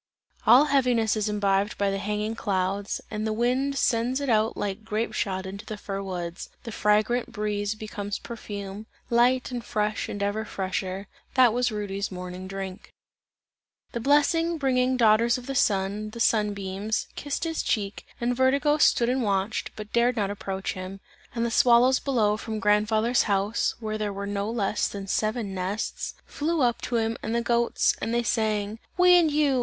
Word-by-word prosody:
All 265 +4 +8
heaviness 250 -6 +2
is 215 -1 0
imbibed 200 -1 +1
by 200 -1 +1
the 195 - -2
hanging 210 +2 -2
clouds, 195 -2 -1
and 215 0 -2
the - - 0
wind 255 +5 0
sends 245 +2 +1
it 280 -2 -2
out 220 0 +2
like 205 +1 -3
grape 220 +1 -2
shot 190 -2 -2
into 200 +3 -7
the 215 -1 -6
fir 195 -1 -5
woods; 175 -2 -5
the 230 - -6
fragrant 215 +4 +1
breeze 210 -2 -2
becomes 210 -1 -5
perfume, 205 -2 -7 0.2
light 250 +2 +3
and 245 -2 -4
fresh 210 -2 -1
and 205 - -3
ever 205 +2 -1
fresher 190 -1 -3 0.3
that 250 -4 +6
was 245 0 +1
Rudy's 200 -2 -3
morning 180 0 -7
drink. 195 0 -6 1.0
The 235 - -3
blessing 325 +6 +3
bringing 260 -2 +1
daughters 230 +1 +4
of 250 - -9
the 275 - -4
Sun, 205 -3 +1
the 235 - -7
sun 210 -3 +2
beams, 200 +2 -2
kissed 285 +2 -3
his 325 -1 -1
cheeks, 200 -2 -1 0.2
and 245 +1 0
Vertigo 280 +4 +3
stood 235 -4 +4
and 255 +2 +1
watched, 200 -1 -1
but 215 -1 -9
dared 235 +1 +3
not 205 -3 0
approach 195 -1 -4
him; 185 +1 -7 0.4
and 230 0 0
the 235 - -1
swallows 250 +1 +5
below 215 -6 +1
from 220 0 -5
grandfather's 215 +3 +2
house, 200 +3 +1
where 215 -2 -3
there 210 -1 -1
were 200 0 -5
no 200 +1 -2
less 210 -3 0
than 200 -1 -6
seven 215 +1 -1
nests, 190 +4 -3
flew 320 +1 -1
up 240 -1 +1
to 245 - -3
him 225 0 0
and 225 +1 -2
the 235 - +2
goats, 235 0 +2
and 225 - -2
they 240 - +1
sang: 215 -1 0 0.2
"We 360 0 +6
and 340 -3 +5
you! 290 -3 +2
215 Hz, 180 wpm, -26 LUFS, 200-240 Hz, 1.0 s, All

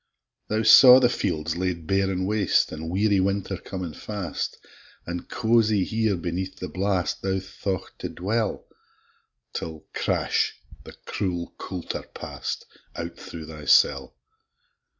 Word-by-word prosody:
Thou 110 +1 0
saw 125 +3 +10
the 125 -2 +4
fields 85 -11 -1
laid 90 -3 -2
bare 95 +2 +1
an' 95 -1 -1
waste, 105 +1 +2
An' 80 +1 -5
weary 100 +2 +2
winter 100 0 0
comin' 90 -3 -6
fast, 100 -3 -4 0.5
An' 90 0 -5
cozie 110 -3 +2
here, 110 -2 +1
beneath 90 +2 -4
the 90 - -4
blast, 95 -1 -1
Thou 95 0 0
thought 95 0 -5
to - - -4
dwell, 105 +4 -2 0.9
'Till, 80 -2 -6
crash! - - 0 0.3
the - - -10
cruel 90 -3 -3
coulter 90 -3 -5
past - - -5 0.3
Out 85 0 -5
thro' 80 -2 -9
thy 75 -1 -9
cell. 70 -2 +4
95 Hz, 130 wpm, -25 LUFS, 85-105 Hz, 0.9 s, saw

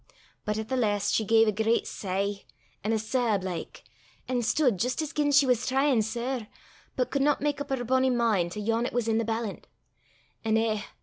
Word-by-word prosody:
But 210 0 -1
at 220 0 -4
the 260 - -1
last 205 -4 +1
she 220 - +2
gae 225 +2 +5
a 215 - +2
gret 220 +3 +1
sich, 200 +1 -3 0.4
an' 215 - 0
a 225 - +2
sab, 220 -3 0
like, 180 -3 -6 0.4
an' 250 -1 0
stude 245 - +2
jist 250 - -1
as 305 - -6
gien 295 -1 +1
she 285 0 +6
was 250 -3 +1
tryin' 270 -2 +3
sair, 235 +1 -3 0.5
but 250 - -1
could 280 - 0
not 290 +1 +3
mak 290 0 -1
up 285 - -5
her 265 -2 -1
bonnie 260 +2 +2
min' 225 -8 +1
to 195 - -6
yon 225 +3 0
'at - - -7
was 240 -1 0
i' 225 - +2
the 230 - +1
ballant. 225 -1 -4 0.8
An' 220 -1 +2
eh! 220 -2 0
230 Hz, 210 wpm, -27 LUFS, 215-260 Hz, 0.8 s, she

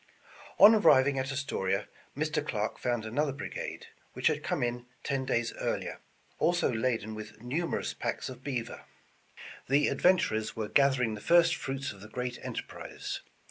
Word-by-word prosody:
On 210 +3 +10
arriving 140 -10 +5
at 130 +1 -2
Astoria, 100 -8 -1 0.3
Mr. 155 0 0
Clarke 110 -7 -2
found 120 -3 -1
another 140 +6 0
brigade, 135 - -6 0.3
which - - -6
had - - +3
come - - -1
in 120 0 -2 0.2
ten 135 -2 -1
days 120 -2 0
earlier, - - -2 0.4
also 175 -5 +2
laden 110 -2 -1
with 110 0 -9
numerous 145 +9 -2
packs - - -3
of 130 0 -9
beaver. 125 -4 -4 0.8
The 140 +2 +4
adventurers 140 -12 +2
were 110 -2 -3
gathering 130 -5 +3
the 105 - -7
first 170 +3 +5
fruits 135 +1 -4
of 100 - -13
the 105 - -10
great 125 +1 -4
enterprise. - - -6
130 Hz, 150 wpm, -30 LUFS, 110-145 Hz, 0.8 s, On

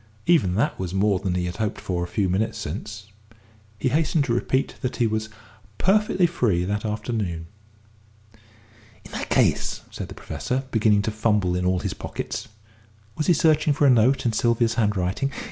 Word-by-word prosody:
Even 145 - +3
that 110 - 0
was 95 0 -3
more 100 -1 +2
than 90 -1 -2
he 90 -1 0
had 90 +2 -4
hoped 110 -2 -2
for 90 -2 -2
a - - -3
few 100 +1 0
minutes 110 +5 0
since. 105 +3 -6 0.7
He 130 - 0
hastened 155 +1 +2
to 125 -4 -1
repeat 130 +2 0
that 125 - -2
he 120 - +1
was 110 0 -1 0.5
perfectly 195 -2 +3
free 120 - +1
that 105 +2 -2
afternoon. 105 -6 -3 1.6
"In - - -12
that - - -5
case," - - +2
said - - -6
the - - -10
Professor, 130 +2 -3
beginning 105 -2 +3
to 110 - -1
fumble 105 -4 +1
in 90 0 0
all 90 -1 +1
his - - -2
pockets - - -5 0.7
was 155 - -2
he 175 - +6
searching 155 -2 +3
for 145 +1 +2
a 135 - +7
note 125 +3 +3
in 115 - +2
Sylvia's 115 +1 +2
handwriting? 105 +3 0
110 Hz, 180 wpm, -24 LUFS, 95-130 Hz, 1.6 s, a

